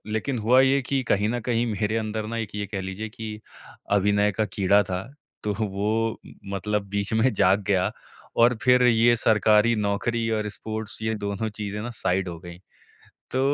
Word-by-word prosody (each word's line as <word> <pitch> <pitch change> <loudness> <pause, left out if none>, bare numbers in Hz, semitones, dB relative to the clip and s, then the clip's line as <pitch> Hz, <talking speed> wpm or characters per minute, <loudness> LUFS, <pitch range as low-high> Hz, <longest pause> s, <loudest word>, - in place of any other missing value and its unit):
लेकिन 110 +4 -2
हुआ 120 +4 +4
ये 135 +1 +4
कि 135 +1 -1
कहीं 105 +1 +2
न 120 +1 -1
कहीं 120 +1 0
मेरे 105 +1 -1
अंदर 110 -1 -3
ना 115 - -4
एक 110 -3 -4
ये 105 0 -2
कह 100 -1 -4
लीजिए 95 +3 -5
कि 110 -1 -7 0.5
अभिनय 105 +1 +3
का 110 +3 0
कीड़ा 100 0 +3
था, 90 0 -4 0.4
तो 105 - 0
वो 110 +2 -1
म - - -13 0.2
मतलब 105 +1 -1
बीच 100 +1 -1
में 110 +3 +3
जाग 95 +1 +3
गया 95 -2 +2 0.5
और 120 +1 +5
फिर 125 0 +5
ये 120 0 +5
सरकारी 110 +1 +4
नौकरी 110 +3 -1
और 105 0 -2
स्पोर्ट्स 110 0 -6
ये 110 0 0
दोनों 100 +1 -3
चीज़ें 105 -1 -4
ना 120 - -5
साइड 95 -4 0
हो 85 -1 -6
गईं। 85 -1 -10 0.7
तो 130 - 0
105 Hz, 185 wpm, -25 LUFS, 100-115 Hz, 0.7 s, और